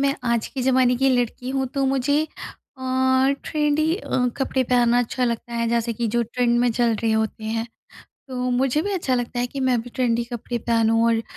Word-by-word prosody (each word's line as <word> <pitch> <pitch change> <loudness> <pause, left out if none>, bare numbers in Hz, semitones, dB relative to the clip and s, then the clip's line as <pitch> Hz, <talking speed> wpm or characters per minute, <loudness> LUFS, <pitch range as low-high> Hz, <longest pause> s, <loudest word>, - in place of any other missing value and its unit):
मैं 275 0 +2
आज 235 -2 +1
के 265 -2 -4
ज़माने 255 -1 +3
की 270 +2 +2
लड़की 245 +1 -2
हूँ 265 0 -1
तो 275 -1 +1
मुझे 275 +3 +1
अ, - - -13 1.2
ट्रेंडी 305 +1 +1
अ, 250 -11 -1
कपड़े 265 -1 0
पहनना 245 -1 +3
अच्छा 245 +1 0
लगता 235 0 -3
है 235 0 0
जैसे 235 0 0
कि 230 +1 -2
जो 235 - +3
ट्रेंड 240 +1 0
में 245 -1 +3
चल 235 -1 +2
रहे 225 -1 +2
होते 220 0 -1
हैं। 225 +1 -2 0.6
तो 255 - -6
मुझे 265 +4 +1
भी 405 +2 -2
अच्छा 300 -9 0
लगता 245 0 -2
है 245 - 0
कि 275 +2 -6
मैं 255 -3 +2
भी 245 - -11
ट्रेंड 240 -2 +1
कपड़े 240 0 -3
पहनूँ 225 0 +2
और 230 -1 +2
245 Hz, 205 wpm, -23 LUFS, 235-265 Hz, 1.2 s, ज़माने